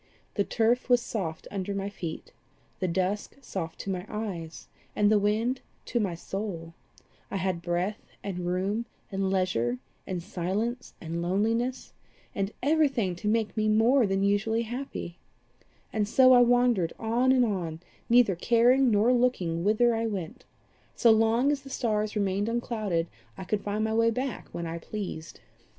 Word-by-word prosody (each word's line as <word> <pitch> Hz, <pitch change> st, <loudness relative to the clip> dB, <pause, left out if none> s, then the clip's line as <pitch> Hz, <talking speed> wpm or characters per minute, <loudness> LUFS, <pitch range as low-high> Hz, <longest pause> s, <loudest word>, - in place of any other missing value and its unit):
The 200 Hz, -, +1 dB
turf 235 Hz, +5 st, +1 dB
was 245 Hz, -1 st, +6 dB
soft 185 Hz, -9 st, -4 dB
under 200 Hz, 0 st, -3 dB
my 195 Hz, 0 st, -2 dB
feet, 175 Hz, -5 st, -7 dB, 0.5 s
the 185 Hz, -, 0 dB
dusk 185 Hz, +4 st, -1 dB
soft 180 Hz, -11 st, -5 dB
to 195 Hz, -, -3 dB
my 180 Hz, -1 st, -3 dB
eyes, 185 Hz, -7 st, -5 dB, 0.3 s
and 205 Hz, 0 st, +3 dB
the 215 Hz, -, +5 dB
wind 220 Hz, +5 st, 0 dB, 0.2 s
to 240 Hz, -, -1 dB
my 195 Hz, -6 st, -1 dB
soul; 170 Hz, -2 st, -5 dB, 0.6 s
I -, -, -2 dB
had 185 Hz, -2 st, -1 dB
breath 180 Hz, +5 st, -1 dB, 0.2 s
and 195 Hz, -3 st, -4 dB
room 195 Hz, +6 st, -1 dB, 0.2 s
and 195 Hz, -1 st, 0 dB
leisure 155 Hz, -11 st, 0 dB, 0.3 s
and 180 Hz, -2 st, -3 dB
silence 210 Hz, +9 st, -3 dB
and 170 Hz, 0 st, -4 dB
loneliness, 225 Hz, +8 st, 0 dB, 0.4 s
and 195 Hz, 0 st, -2 dB
everything 270 Hz, -, +2 dB
to 210 Hz, -, -4 dB
make 215 Hz, -2 st, +1 dB
me 215 Hz, -1 st, +1 dB
more 225 Hz, +3 st, +4 dB
than 195 Hz, 0 st, 0 dB
usually 215 Hz, +3 st, +1 dB
happy; 240 Hz, -7 st, -6 dB, 0.7 s
and 210 Hz, -2 st, +1 dB
so 255 Hz, +3 st, +6 dB
I 250 Hz, -, +8 dB
wandered 245 Hz, -7 st, +3 dB
on 235 Hz, +3 st, +2 dB
and 255 Hz, -2 st, +4 dB
on, 175 Hz, -7 st, -3 dB, 0.3 s
neither 235 Hz, -5 st, +5 dB
caring 245 Hz, +7 st, +4 dB
nor 220 Hz, +3 st, +4 dB
looking 190 Hz, -10 st, +1 dB
whither 220 Hz, +4 st, +3 dB
I 225 Hz, 0 st, 0 dB
went: 190 Hz, -7 st, -5 dB, 0.5 s
so 235 Hz, -, +5 dB
long 225 Hz, +5 st, +3 dB
as 285 Hz, -2 st, -1 dB
the 275 Hz, -, -11 dB
stars 215 Hz, -4 st, -1 dB
remained 200 Hz, +1 st, 0 dB
unclouded, 215 Hz, -8 st, -1 dB, 0.3 s
I 190 Hz, -, -6 dB
could 200 Hz, +3 st, -1 dB
find 210 Hz, +1 st, -2 dB
my 220 Hz, 0 st, 0 dB
way 230 Hz, +1 st, +4 dB
back 250 Hz, +1 st, -3 dB
when 170 Hz, -, -4 dB
I 165 Hz, 0 st, -4 dB
pleased. 180 Hz, -4 st, -6 dB
210 Hz, 160 wpm, -28 LUFS, 185-235 Hz, 0.7 s, I